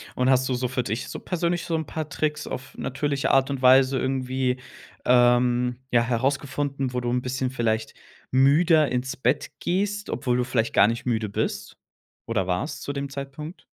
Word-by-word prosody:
Und 125 +1 +2
hast 130 0 +3
du - - +1
so 125 0 -1
für 125 0 -2
dich 110 +2 -3
so - - -6
persönlich 175 -1 -1
so 165 - -1
'n 160 -1 -2
paar 155 0 -5
Tricks 150 +1 -2
auf 130 +1 -7
natürliche 140 +1 -1
Art 135 0 +3
und 135 -2 -3
Weise 130 +1 +5
irgendwie, 130 -1 -1 0.5
ähm, 125 0 +3
ja, 120 - +4
herausgefunden, 135 +2 -1
wo 125 - 0
du 120 - -2
'n 125 +1 0
bisschen 130 0 -2
vielleicht 110 -3 -1 0.4
müder 150 +4 +4
ins 125 +1 -2
Bett - - 0
gehst, 205 +3 -1
obwohl 125 -1 0
du 125 - +1
vielleicht 120 -2 -1
gar - - +6
nicht 115 +2 -3
müde 110 -4 0
bist - - -3 0.5
oder 105 -5 -1
warst 90 - -2
zu 140 - -4
dem 140 0 -4
Zeitpunkt? 140 +4 -7
130 Hz, 185 wpm, -25 LUFS, 125-140 Hz, 0.5 s, gar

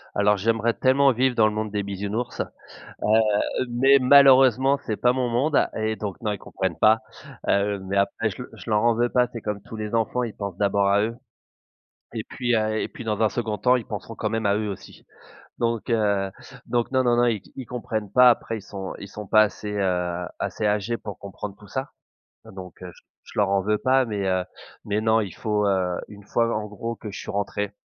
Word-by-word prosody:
Alors 100 0 +3
j'aimerais 115 +3 +1
tellement 135 +1 +4
vivre 130 +1 +1
dans 110 -2 +5
le 105 - -2
monde 110 0 -3
des 105 0 -1
bisounours. 100 +4 -3
Heu, - - -1 1.2
mais 135 +3 +5
malheureusement, 135 0 +6
c'est 110 - -1
pas 125 0 +3
mon 125 -1 -1
monde 135 +6 +2 0.2
et 110 0 -1
donc, 100 -3 -5
non, 105 - 0
ils 100 - -5
comprennent 95 -3 -4
pas. 110 +1 +5 0.5
Heu, 100 0 +1
mais 95 +1 -4
après 100 +3 +1
je 100 - -7
leur - - -11
je - - -8
leur 105 -1 +3
en 120 0 +4
veux 120 +2 +1
pas, 125 0 +2
c'est 115 - -6
comme 105 -1 -4
tous - - -11
les 105 -1 -5
enfants, 115 +2 0
ils 115 -3 -4
pensent 100 -3 -5
d'abord 100 -1 +2
à 100 +1 +3
eux. 115 +2 -2 1.0
Et - - -3
puis, 120 -1 -1
heu 110 0 0
et - - -2
puis - - -10
dans 110 -1 -2
un 110 - +5
2nd 110 -1 -3
temps, 125 +6 +3
ils 120 - -2
penseront 110 +1 -7
quand 110 - -2
même 110 0 -2
à 100 0 +3
eux 105 0 -2
aussi. 100 - -10 0.5
Donc 115 -1 -1
heu, 100 -4 +1 0.3
donc, 120 0 -1
non, 130 -1 +2
non, 120 -1 +4
non, 120 0 +4
ils 115 +3 -4
comprennent 110 -4 -4
pas 125 +1 +7
après 115 -1 0
ils 105 - -9
sont 95 -2 -7
ils 100 - -8
sont 105 0 -8
pas 110 +2 +6
assez, 105 0 -4
heu, 90 -3 -1
assez 110 - -3
âgés 105 +3 0
pour 105 -3 -8
comprendre 100 0 -7
tout 105 - -15
ça, 130 +6 -4 0.5
donc 95 -2 -10 0.5
je - - -15
leur 100 -1 +3
en 100 -1 +2
veux 105 +2 +1
pas. 130 +3 +3
Mais 105 -4 -3
heu, 95 -1 +1 0.4
mais 105 +1 0
non, 110 0 +3
il 100 - -4
faut, 105 -2 0
heu 95 -2 0
une 105 -1 -13
fois 115 +2 +1
en 105 - -4
gros 115 +3 -5
que 105 -2 -8
je - - -7
suis - - -6
rentré, 100 0 -2
110 Hz, 220 wpm, -24 LUFS, 100-120 Hz, 1.2 s, pas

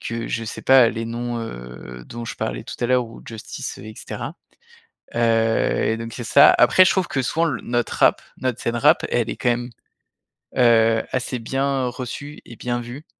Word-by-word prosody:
que, 115 0 -4
je 115 - -2
sais 110 - -7
pas 130 -3 +6
les 115 - -4
noms, 120 +1 -4
heu, 60 - -9
dont 120 0 -7
je - - -6
parlais - - -4
tout - - -7
à 120 - +1
l'heure 125 0 +2
ou 115 - -13
Justice 110 -2 -7
et 110 - -9
cetera. - - -6 0.8
Heu, - - 0 0.7
et 110 - 0
donc 115 0 -7
c'est 120 0 -6
ça 140 +4 +7
après 185 - +6
je - - +4
trouve 190 -2 0
que 135 - 0
souvent 165 +6 0
notre 120 0 -1
rap, - - +4 0.2
notre 130 -2 -2
scène 115 0 -1
rap, 150 +7 +4
elle 120 -2 0
est - - -3
quand 120 - 0
même, 120 +1 -1 0.9
heu, 115 -2 +4
assez 130 0 -2
bien 135 +2 -1
reçue 130 +4 -6
et 120 - -11
bien 120 +1 -2
vue. 120 +6 -9
120 Hz, 195 wpm, -22 LUFS, 115-130 Hz, 0.9 s, ça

